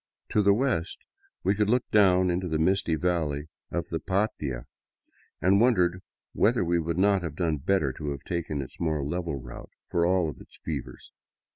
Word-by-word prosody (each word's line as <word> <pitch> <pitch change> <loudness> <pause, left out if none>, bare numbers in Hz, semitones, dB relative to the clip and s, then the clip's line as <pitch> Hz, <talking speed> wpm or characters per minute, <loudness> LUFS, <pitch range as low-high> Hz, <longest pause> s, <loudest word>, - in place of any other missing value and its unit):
To 105 - +3
the 100 0 +5
west 110 -9 0 0.5
we 95 - +3
could 105 0 +1
look 125 +1 +2
down 95 -3 +5
into 90 +1 -1
the 80 -2 0
misty 85 0 +2
valley 80 -3 -1 0.2
of - - -3
the - - -2
Patia 75 - -2 0.4
— - - -37
and 95 +3 +5
wonder 90 -7 +3 0.3
whether 115 -3 +2
we 85 0 +2
would 85 +1 -2
not 100 0 +3
have 80 -4 -5
done 80 -2 0
better 75 -2 +1
to 75 +2 -5
have 70 -1 -5
taken 80 -5 -3
its 65 - -13
more 80 -3 0
level 85 +1 -2
route, 60 -3 -9 0.2
for 85 - +2
all 90 -3 +2
its - - -16
fevers. - - -6
85 Hz, 180 wpm, -27 LUFS, 80-95 Hz, 0.5 s, the